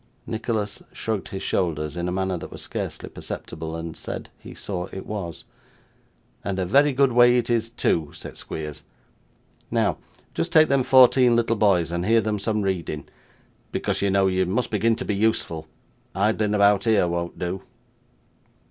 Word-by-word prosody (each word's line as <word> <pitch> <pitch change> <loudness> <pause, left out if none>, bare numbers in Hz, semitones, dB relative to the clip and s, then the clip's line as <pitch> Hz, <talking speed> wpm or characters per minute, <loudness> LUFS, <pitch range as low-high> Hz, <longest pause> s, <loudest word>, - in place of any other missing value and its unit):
Nicholas 110 -2 -2
shrugged 110 -3 -3
his 95 0 -6
shoulders 75 -6 -1
in 85 0 -2
a - - -1
manner 95 0 -1
that 85 - -6
was - - -7
scarcely - - -5
perceptible, 80 0 -6
and 80 -1 -6
said - - -6
he - - -11
saw 90 -2 -4
it 95 - -7
was. 90 -7 -5 1.0
'And 100 -1 -2
a 95 - 0
very 140 +10 +4
good 135 0 +3
way 120 +1 +6
it 120 0 0
is, 115 -1 +1
too,' 80 -8 0
said - - -9
Squeers. 75 -2 -6 0.9
'Now, - - +1 0.3
just 170 - -2
take 155 -1 +6
them 140 -1 +3
fourteen 125 -1 +6
little 115 0 +2
boys 95 -6 +3
and 85 0 -1
hear 115 +4 +4
them 105 -1 -1
some 105 0 -1
reading, 85 -6 -2 0.6
because, - - -1
you 100 - +2
know, 95 0 +3
you 95 -1 +1
must 110 +6 -1
begin 115 +2 +2
to - - -4
be 105 - 0
useful. 100 -7 0 0.5
Idling 105 +1 +1
about 100 0 +4
here 110 -5 +4
won't 85 0 -3
do. 90 +1 -3
100 Hz, 170 wpm, -24 LUFS, 90-115 Hz, 1.0 s, way